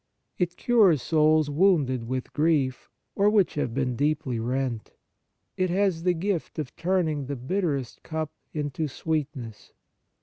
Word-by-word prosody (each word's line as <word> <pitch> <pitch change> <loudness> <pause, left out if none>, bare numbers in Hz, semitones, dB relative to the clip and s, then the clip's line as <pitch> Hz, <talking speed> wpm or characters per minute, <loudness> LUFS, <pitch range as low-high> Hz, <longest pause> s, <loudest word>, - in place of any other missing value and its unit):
It 175 -1 -1
cures 210 - +4
souls 155 +2 +3
wounded 145 -8 +2
with 130 +1 -4
grief, 145 -5 +1 0.3
or 200 +1 +4
which 210 -4 +3
have 145 -5 -1
been 125 0 -1
deeply 145 -3 0
rent. 125 -1 -2 0.6
It 185 0 +1
has 185 -2 +1
the 180 +1 +2
gift 180 0 -2
of 150 -5 -5
turning 165 -6 0
the 140 - -3
bitterest 140 -1 -2
cup 155 -1 -4 0.2
into 150 0 -2
sweetness. 140 -6 -4
155 Hz, 135 wpm, -26 LUFS, 130-175 Hz, 0.6 s, cures